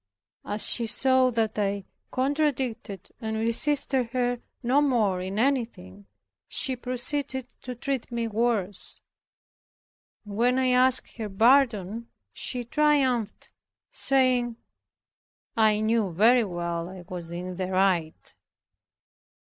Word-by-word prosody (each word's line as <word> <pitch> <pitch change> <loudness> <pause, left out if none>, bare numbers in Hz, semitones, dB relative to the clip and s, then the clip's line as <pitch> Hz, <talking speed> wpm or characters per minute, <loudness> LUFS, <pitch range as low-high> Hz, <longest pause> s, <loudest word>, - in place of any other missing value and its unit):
As 210 +1 -1
she 235 -2 0
saw 260 +2 +4
that 225 -3 -1
I 200 -1 -1 0.3
contradicted 260 - -2
and 220 -1 -3
resisted 255 +3 +1
her 245 -1 0 0.2
no 260 +4 +3
more 220 -10 +1
in 190 +2 -5
anything, 225 - -2 0.4
she 260 - +1
proceeded 255 +1 -2
to 250 -1 -6
treat 270 -1 -3
me 235 -1 -2
worse. 215 -4 -1 1.3
And 205 -1 -8
when 245 +2 +3
I 260 -1 +2
asked 255 0 +2
her 220 -3 -4
pardon 230 -1 +2 0.3
she 250 -2 -2
triumphed, 260 -4 0 0.4
saying, 255 - +2 1.0
"I 215 -1 +3
knew 215 -3 +1
very 225 +7 +4
well 170 -2 -4
I 185 -1 -10
was 175 -2 -7
in 180 +1 -6
the 185 -1 -2
right." 185 -4 0
230 Hz, 115 wpm, -26 LUFS, 200-255 Hz, 1.3 s, saw